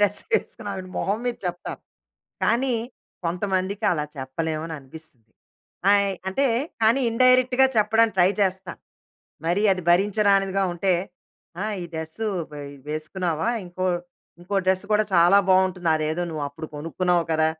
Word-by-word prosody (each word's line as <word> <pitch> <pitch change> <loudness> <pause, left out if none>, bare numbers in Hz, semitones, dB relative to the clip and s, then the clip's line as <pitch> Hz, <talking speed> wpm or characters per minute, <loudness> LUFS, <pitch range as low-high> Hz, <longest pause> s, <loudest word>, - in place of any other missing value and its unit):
Dress 205 0 +2
వేసుకున్నావు 205 - -2
అని 185 - -11
మొహం 200 +3 0
మీద 240 - -1
చెప్తాను. 175 0 -5 0.6
కానీ, 250 +1 +2 0.5
కొంతమందికి 190 +4 -1
అలా 150 -3 -1
చెప్పలేము 155 +4 -3
అని 160 - -6
అనిపిస్తుంది. 135 -5 -14 0.6
ఆయ్ 200 -1 +3 0.2
అంటే, 270 +9 +1 0.4
కానీ 230 +5 +4
ఇండైరెక్ట్‌గా 255 +2 +4
చెప్పడానికి 220 0 +3
ట్రై 180 +1 +6
చేస్తా. 190 -1 -1 0.7
మరీ 180 +5 +1
అది 185 - -6
భరించరానిదిగా 195 0 +3
ఉంటే 185 +2 +1 0.7
ఆ! - - -1 0.2
ఈ - - -5
డ్రెస్సు 160 +7 -4 0.2
పై 150 -1 -8 0.3
వేసుకున్నావా 160 +4 -2 0.2
ఇంకో 180 +1 -5 0.6
ఇంకో 185 +3 -5
డ్రెస్సు 190 +1 +1
కూడా 215 +1 +4
చాలా 175 +3 +6
బాగుంటుంది. 185 -2 +3
అదేదో 155 +3 -1
నువ్వు 155 -2 -4
అప్పుడు 155 +3 -8
కొనుక్కున్నావు 170 +2 0
కదా! 160 0 +3
185 Hz, 135 wpm, -24 LUFS, 165-205 Hz, 0.7 s, ట్రై